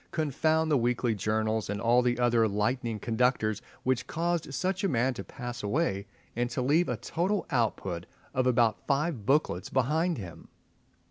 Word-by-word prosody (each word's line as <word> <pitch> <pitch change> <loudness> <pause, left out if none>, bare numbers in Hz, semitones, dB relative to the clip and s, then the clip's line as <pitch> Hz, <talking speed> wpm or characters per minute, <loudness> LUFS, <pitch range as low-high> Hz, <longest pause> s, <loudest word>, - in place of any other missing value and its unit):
Confound 155 +1 +1
the 145 - +4
weekly 120 0 +1
journals 110 +1 -1
and 105 0 -2
all 120 +3 +4
the 120 -1 +1
other 120 -2 +3
lightning 115 +3 -1
conductors 110 -2 +1 0.2
which 130 -1 0
caused 170 -2 -1
such 185 +8 -1
a 195 - +2
man 130 0 +1
to 120 - -6
pass 120 -2 -7
away, 100 - -1 0.3
and 120 +1 0
to 125 +1 -2
leave 155 +7 +3
a - - -1
total 185 +5 -1
output 100 -8 -1 0.3
of 130 0 +1
about 120 -3 +2
five 140 -5 0
booklets 135 - +1
behind 155 +7 +1
him! 90 -6 -9
125 Hz, 160 wpm, -29 LUFS, 110-150 Hz, 0.3 s, the